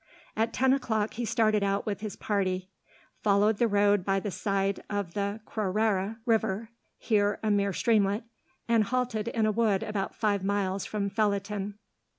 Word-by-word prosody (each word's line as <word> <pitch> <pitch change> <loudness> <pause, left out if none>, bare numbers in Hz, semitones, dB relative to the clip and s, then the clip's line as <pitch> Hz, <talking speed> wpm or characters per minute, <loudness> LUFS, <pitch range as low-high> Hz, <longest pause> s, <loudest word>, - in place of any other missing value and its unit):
At 225 +1 +1
ten 265 +2 +3
o'clock 220 -6 0
he 240 +1 -3
started 220 -2 +2
out 200 0 0
with 205 -2 -2
his 215 -2 -5
party, 190 -2 -1 0.5
followed 205 +1 +3
the 235 - +4
road 205 -2 +3
by 195 +1 +1
the 200 +1 -4
side 195 0 -1
of 200 -4 -3
the 200 +1 -2
Crorrere 210 0 0
river 220 -2 +1 0.3
here 205 -2 +1
a 215 - +2
mere 200 -1 +2
streamlet 210 0 +2 0.4
and 230 -2 +3
halted 245 -2 -1
in 230 -2 +1
a 215 - +3
wood 215 -3 +1
about 205 -2 -3
five 205 -3 0
miles 195 -1 -1
from 205 -2 -2
Felletin. 205 -1 -1
205 Hz, 165 wpm, -28 LUFS, 200-220 Hz, 0.5 s, the